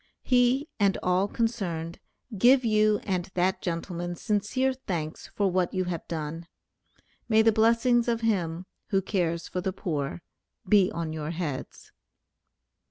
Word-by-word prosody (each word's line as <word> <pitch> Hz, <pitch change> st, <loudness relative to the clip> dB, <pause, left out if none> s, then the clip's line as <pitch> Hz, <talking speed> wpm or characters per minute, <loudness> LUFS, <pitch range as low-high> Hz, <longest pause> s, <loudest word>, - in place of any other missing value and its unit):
He, 250 Hz, +3 st, +3 dB
and 200 Hz, -2 st, +3 dB
all 180 Hz, +2 st, +2 dB
concerned, 185 Hz, -8 st, -2 dB, 0.4 s
give 250 Hz, +5 st, +5 dB
you 215 Hz, -1 st, +3 dB
and 185 Hz, -3 st, -1 dB
that 185 Hz, +1 st, +1 dB
gentleman 175 Hz, 0 st, -3 dB
sincere 215 Hz, +8 st, 0 dB
thanks 170 Hz, -11 st, -5 dB
for 200 Hz, -2 st, +1 dB
what 185 Hz, +1 st, 0 dB
you 185 Hz, -, +1 dB
have 175 Hz, -3 st, -4 dB
done. 165 Hz, +1 st, -5 dB, 0.8 s
May 220 Hz, 0 st, +5 dB
the 225 Hz, -, +5 dB
blessings 230 Hz, +2 st, +3 dB
of 230 Hz, -1 st, 0 dB
Him, 180 Hz, -6 st, -1 dB, 0.2 s
who 195 Hz, -3 st, +1 dB
cares 170 Hz, -4 st, -1 dB
for 180 Hz, -, -3 dB
the 190 Hz, +1 st, -1 dB
poor, 165 Hz, -3 st, -3 dB, 0.4 s
be 195 Hz, -2 st, +5 dB
on 165 Hz, -2 st, -4 dB
your 155 Hz, -1 st, -4 dB
heads. 160 Hz, -5 st, -5 dB
185 Hz, 140 wpm, -27 LUFS, 170-220 Hz, 0.8 s, give